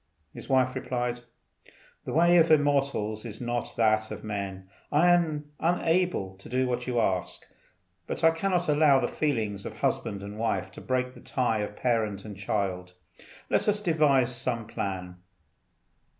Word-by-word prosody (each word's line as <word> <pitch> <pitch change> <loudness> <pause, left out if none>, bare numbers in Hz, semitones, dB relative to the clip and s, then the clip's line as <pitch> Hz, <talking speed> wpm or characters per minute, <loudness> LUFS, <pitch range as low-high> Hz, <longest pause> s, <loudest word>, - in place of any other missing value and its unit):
His - - -10
wife 130 -1 +3
replied, 125 -1 -2 0.9
"The - - -4
way 170 +2 +5
of 165 -1 +5
immortals 140 -8 +2
is 110 -3 -7
not 120 -1 -3
that 110 -1 +2
of - - -7
men. 100 -3 -5 0.2
I 170 +4 +5
am 155 -4 +1
unable 170 - +1
to 95 - -13
do 130 +2 +1
what 125 0 -2
you 120 -2 0
ask, 95 -5 -1 0.6
but - - -4
I 165 - +7
cannot 175 +1 0
allow 150 -2 +5
the - - 0
feelings 110 -9 -1
of - - -7
husband 100 -1 -1
and 100 +1 -8
wife 95 -4 -1
to - - -11
break 125 0 -1
the - - -14
tie 120 -4 0
of 105 0 -4
parent 110 -5 -1
and 105 -2 -7
child. 95 -2 -3 0.6
Let - - +2
us 210 0 +1
devise 145 - +2
some 120 -2 -2
plan." 90 -4 -5
120 Hz, 160 wpm, -28 LUFS, 105-150 Hz, 0.9 s, I